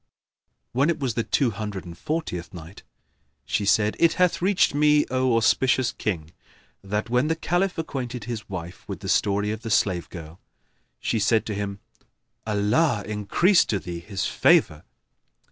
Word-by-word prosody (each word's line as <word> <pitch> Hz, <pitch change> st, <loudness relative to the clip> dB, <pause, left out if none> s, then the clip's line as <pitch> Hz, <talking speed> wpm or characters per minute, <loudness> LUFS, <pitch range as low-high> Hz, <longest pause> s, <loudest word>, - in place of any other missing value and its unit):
When 135 Hz, +6 st, +2 dB
it 165 Hz, -1 st, 0 dB
was 130 Hz, -5 st, -1 dB
the 115 Hz, -, -1 dB
Two 125 Hz, 0 st, +1 dB
Hundred 105 Hz, -2 st, -5 dB
and 85 Hz, -1 st, -9 dB
Fortieth 95 Hz, -, -4 dB
Night, 85 Hz, +3 st, -11 dB, 0.6 s
She 85 Hz, +9 st, -1 dB
said, 105 Hz, +1 st, +2 dB
It 170 Hz, -1 st, +4 dB
hath 180 Hz, -2 st, +1 dB
reached 190 Hz, -3 st, +3 dB
me, 150 Hz, 0 st, +4 dB
O 130 Hz, -2 st, +2 dB
auspicious 130 Hz, +2 st, +2 dB
King, 80 Hz, -6 st, -4 dB, 0.5 s
that 105 Hz, +3 st, -3 dB
when 125 Hz, +4 st, +2 dB
the 160 Hz, -, +1 dB
Caliph 180 Hz, +3 st, -1 dB
acquainted 130 Hz, -7 st, -4 dB
his 110 Hz, -1 st, -6 dB
wife 90 Hz, -2 st, -7 dB
with -, -, -6 dB
the -, -, -6 dB
story 105 Hz, 0 st, +1 dB
of 110 Hz, 0 st, -5 dB
the 115 Hz, -, -6 dB
slave 95 Hz, -5 st, +1 dB
girl, 80 Hz, -1 st, -10 dB, 0.6 s
she 115 Hz, -, -1 dB
said 110 Hz, +2 st, +2 dB
to 110 Hz, -, -3 dB
him, 100 Hz, 0 st, -4 dB, 0.7 s
"Allah 105 Hz, +4 st, +1 dB
increase 105 Hz, -, +3 dB
to 105 Hz, -, -1 dB
thee 90 Hz, -2 st, -6 dB
His 95 Hz, +2 st, -4 dB
favour!" 75 Hz, 0 st, +3 dB
110 Hz, 160 wpm, -24 LUFS, 100-135 Hz, 0.7 s, It